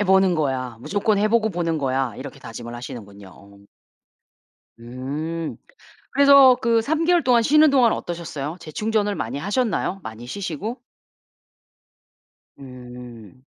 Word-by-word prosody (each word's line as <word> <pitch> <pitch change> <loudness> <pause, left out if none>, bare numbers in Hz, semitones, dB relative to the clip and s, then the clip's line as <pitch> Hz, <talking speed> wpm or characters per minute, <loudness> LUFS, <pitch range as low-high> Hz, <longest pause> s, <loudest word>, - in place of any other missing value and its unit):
'해 205 - +2
보는 190 -1 +4
거야. 130 -6 -2
무조건 205 - 0
해 210 +1 +2
보고 220 -1 +2
보는 165 -3 -1
거야.' 130 -3 -1
이렇게 135 +1 -9
다짐을 120 +1 -8
하시는군요. 100 -5 -9
어. 100 +1 -17 1.2
음. 145 +7 -5 0.6
그래서 280 -2 +7
그 230 -1 +3
3 315 +7 -1
개월 350 -1 +3
동안 240 -2 +4
쉬는 305 +4 +5
동안 255 -5 +4
어떠셨어요? 165 -2 -5
재충전을 210 +6 -1
많이 120 +5 -4
하셨나요? 200 - -1
많이 110 +2 -8
쉬시고? 200 - -5 1.8
음. 125 -2 -12
165 Hz, 270 characters per minute, -22 LUFS, -, 1.8 s, 그래서